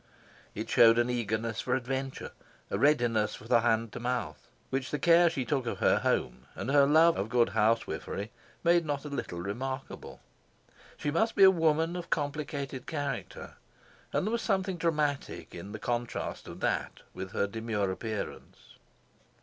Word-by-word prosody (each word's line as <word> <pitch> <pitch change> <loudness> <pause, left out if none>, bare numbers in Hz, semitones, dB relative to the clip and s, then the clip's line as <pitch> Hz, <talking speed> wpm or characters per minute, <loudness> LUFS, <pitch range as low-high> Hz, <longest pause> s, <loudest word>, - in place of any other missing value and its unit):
It - - -4
showed 115 0 +6
an 120 +1 +2
eagerness 115 -1 -2
for 125 - 0
adventure, 130 +1 -4 0.4
a - - -1
readiness 120 -7 +2
for 110 - -12
the 120 -1 +5
hand 115 -1 +1
to - - -5
mouth, 120 - -3 0.2
which 130 0 -2
the 150 - -1
care 170 +2 +5
she 135 -6 -3
took 135 -3 -1
of - - -2
her - - +3
home - - -1
and 130 - -3
her 140 -1 +6
love 160 +3 +5
of 100 +3 -2
good 120 -3 +3
housewifery 110 -1 0 0.3
made 170 0 +4
not 145 -2 -3
a - - -5
little 115 -11 -4
remarkable. 130 +8 -5 0.8
She 145 - -2
must 220 +9 +1
be 200 - +6
a 190 - +10
woman 165 -1 +1
of 175 -1 -6
complicated 145 -3 -3
character, 145 -5 -5 0.5
and - - 0
there 215 - -1
was 235 0 0
something 190 -3 0
dramatic 150 -4 -1
in 90 +4 -8
the 110 - -5
contrast 120 +2 -3
of - - -9
that - - -1
with 95 +1 -7
her - - +1
demure 105 -2 -2
appearance. 110 +2 -6
130 Hz, 165 wpm, -30 LUFS, 115-155 Hz, 0.8 s, a